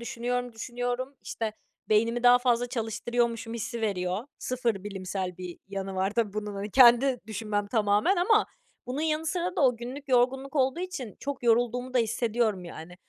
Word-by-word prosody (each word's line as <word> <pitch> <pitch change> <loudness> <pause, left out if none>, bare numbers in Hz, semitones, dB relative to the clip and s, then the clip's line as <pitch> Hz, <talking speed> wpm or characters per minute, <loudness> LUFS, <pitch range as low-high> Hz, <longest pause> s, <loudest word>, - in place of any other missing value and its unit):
düşünüyorum, 245 +1 -3
düşünüyorum, 245 +3 -3
işte, 225 -2 -3 0.4
beynimi 230 +3 +2
daha 245 0 +7
fazla 245 -1 +2
çalıştırıyormuşum 235 0 -1
hissi 235 +1 -4
veriyor. 190 0 -1
Sıfır 235 -6 -1
bilimsel 185 -2 -4
bir 180 -1 -7
yanı 195 -1 -4
var 190 +1 0
tabii 220 -2 0
bunun, 210 -1 -4
hani, 200 +2 -4
kendi 250 +1 +6
düşünmem 210 -1 -2
tamamen 210 - +2
ama 420 +5 +4 0.4
bunun 255 +4 -3
yanı 315 0 0
sıra 360 +2 -1
da - - +1
o 250 -2 +4
günlük 260 +5 -8
yorgunluk 265 +3 +2
olduğu 265 +5 +2
için 275 - -5
çok 280 -2 -4
yorulduğumu 245 +2 +1
da 250 - +4
hissediyorum, 225 -3 0
yani. 170 0 -9
235 Hz, 160 wpm, -28 LUFS, 210-255 Hz, 0.4 s, daha